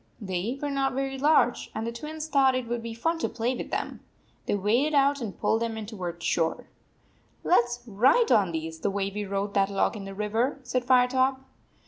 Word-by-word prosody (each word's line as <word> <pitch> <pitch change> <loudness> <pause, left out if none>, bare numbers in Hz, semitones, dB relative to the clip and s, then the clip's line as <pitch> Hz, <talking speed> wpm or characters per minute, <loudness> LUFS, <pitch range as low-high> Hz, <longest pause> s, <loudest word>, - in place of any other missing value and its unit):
They 200 +4 -3
were 290 0 -2
not 270 -1 0
very 270 0 -2
large, 290 -4 +3
and 220 +1 -2
the 230 - -2
Twins 305 +6 -6
thought 270 -4 +4
it 255 -2 -2
would 240 0 -2
be 230 0 -6
fun 325 +8 -1
to - - -1
play 240 +2 -1
with - - -6
them. - - -3 0.5
They - - +1
waded 235 +10 +1
out 280 0 +3
and 215 -5 -6
pulled 225 - +1
them 230 -1 -2
in 220 - -5
toward 180 -6 -6
shore. 165 -1 0 0.4
" - - -36 0.3
Let 245 -9 +4
s 240 0 -7
ride 255 - +3
on 200 -6 +4
these 160 0 -5
the 205 - 0
way 195 0 -2
we 210 0 -3
rode 200 +1 -2
that 195 -1 +2
log 200 +3 0
in 200 -2 -7
the 195 0 -8
river," 220 +7 0
said 255 -1 -1
Firetop. 260 +1 +3
235 Hz, 215 wpm, -27 LUFS, 200-270 Hz, 0.5 s, thought